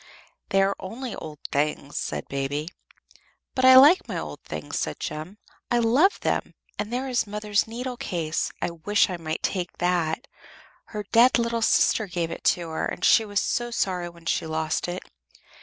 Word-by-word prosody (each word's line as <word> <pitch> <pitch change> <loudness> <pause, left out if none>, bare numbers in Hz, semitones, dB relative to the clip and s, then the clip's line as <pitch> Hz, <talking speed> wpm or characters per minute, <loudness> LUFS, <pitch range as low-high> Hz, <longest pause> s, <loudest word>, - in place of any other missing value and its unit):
"They 195 0 +4
are 195 +1 +1
only 235 +5 -6
old 155 -1 -8
things," 145 0 -1
said - - -4
Baby. 140 +3 -2 0.8
"But 255 - +1
I 260 0 +9
like 290 +8 +8
my - - -4
old - - -6
things," - - -5
said - - -3
Jem. 155 +7 -5 0.3
"I 240 - +2
love 255 - +3
them. - - -1 0.2
And 210 +2 -3
there 255 +2 -2
is 245 -4 0
mother's 210 0 0
needle 245 +2 -5
case. 165 -7 -2
I - - -1
wish 195 +5 +1
I 180 - -3
might 160 -1 -4
take 180 -2 -2
that. 175 - 0 0.6
Her 210 -1 -6
dead 240 +3 +6
little 235 -1 0
sister 220 -1 +3
gave 170 -2 -2
it - - -7
to 170 -2 +2
her, 160 - -2
and 180 - -3
she 225 -2 +6
was 205 -1 0
so 240 +4 -1
sorry 180 -6 -1
when 170 -1 -17
she 165 - 0
lost 160 +1 -1
it." 175 +1 -4
195 Hz, 180 wpm, -25 LUFS, 165-235 Hz, 0.8 s, I